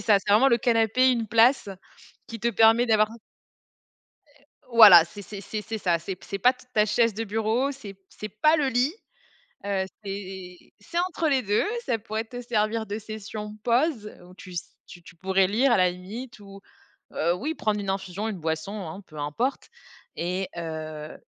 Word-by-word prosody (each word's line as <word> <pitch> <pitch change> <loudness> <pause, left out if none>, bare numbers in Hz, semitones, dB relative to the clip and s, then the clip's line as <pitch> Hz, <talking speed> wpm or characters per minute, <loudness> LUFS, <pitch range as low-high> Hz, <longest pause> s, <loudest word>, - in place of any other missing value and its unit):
ça, 210 -3 +4
c'est 200 - -1
vraiment 245 +6 +6
le 235 - +3
canapé, 235 +2 +3
une 235 -3 -1
place 230 +1 +4 0.6
qui 230 - -8
te 235 - +1
permet 225 +3 +4
d'avoir 215 -1 +3 1.2
Heu 290 -1 -27 0.3
voilà, 190 -7 +10
c'est 205 +5 -11
c'est 200 +1 -9
c'est 210 +2 -5
c'est 225 +1 -5
ça, 175 -4 +1
c'est 185 +3 -6
p - - -17
c'est 200 - -4
pas 250 +6 +5
t 255 0 -20
ta 210 0 +4
chaise 230 0 +2
de 225 +2 -3
bureau, 225 +5 0
c'est 215 -8 -10
p 195 - -36
c'est 215 +2 -8
pas 305 +11 +3
le 285 -3 +1
lit, 255 +5 +1 0.7
heu, 195 -2 -1 0.2
c'est 190 -2 -7 0.2
c'est 340 0 -4
entre 340 -3 -1
les 270 -2 +2
2 205 -2 +1 0.2
ça 230 - 0
pourrait 220 +1 -4
te 245 +1 -8
servir 220 -1 -1
de 210 +1 -5
session 215 0 -7
pause 240 -2 +1
où 180 - -15
tu 185 -2 -12
s 175 - -6
tu 175 - -13
tu 170 - -15
pourrais 190 +2 +1
lire 240 +7 +2
à - - +4
la 185 -1 +4
limite 210 +8 -9
ou, 200 -1 -12 0.5
heu, 170 +2 0
oui 300 - -3
prendre 210 -5 -1
une 195 - -3
infusion, 195 +2 -3
une 210 -4 -5
boisson 160 +4 -3
hein, 185 +6 -8
peu 155 -2 -12
importe 150 - -2 0.5
et 180 +2 -2
heu 155 -2 -6
210 Hz, 195 wpm, -25 LUFS, 190-235 Hz, 1.2 s, voilà